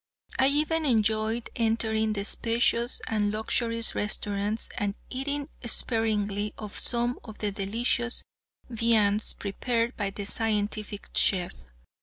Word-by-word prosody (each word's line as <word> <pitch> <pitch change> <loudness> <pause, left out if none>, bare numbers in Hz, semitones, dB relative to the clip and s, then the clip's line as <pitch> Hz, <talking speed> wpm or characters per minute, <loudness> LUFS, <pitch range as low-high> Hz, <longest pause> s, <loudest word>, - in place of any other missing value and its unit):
I 265 - +7
even 305 +3 +2
enjoyed 220 -2 +1
entering 220 -1 +1
the 200 -1 -2
spacious 235 +2 +1
and 210 -2 +1
luxurious 230 +2 0
restaurants 205 +1 -1
and 205 -1 -1 0.2
eating 280 +2 -2 0.2
sparingly 210 -3 0
of 210 -2 -7
some 240 +1 +2
of 220 -3 -10
the 210 -1 -1
delicious 230 +4 0 0.4
viands 220 -3 +2
prepared 230 +4 -1
by 200 -2 -1
the 200 +1 -6
scientific 210 -1 -1
chef. 180 -3 +2
220 Hz, 115 wpm, -28 LUFS, 205-235 Hz, 0.4 s, I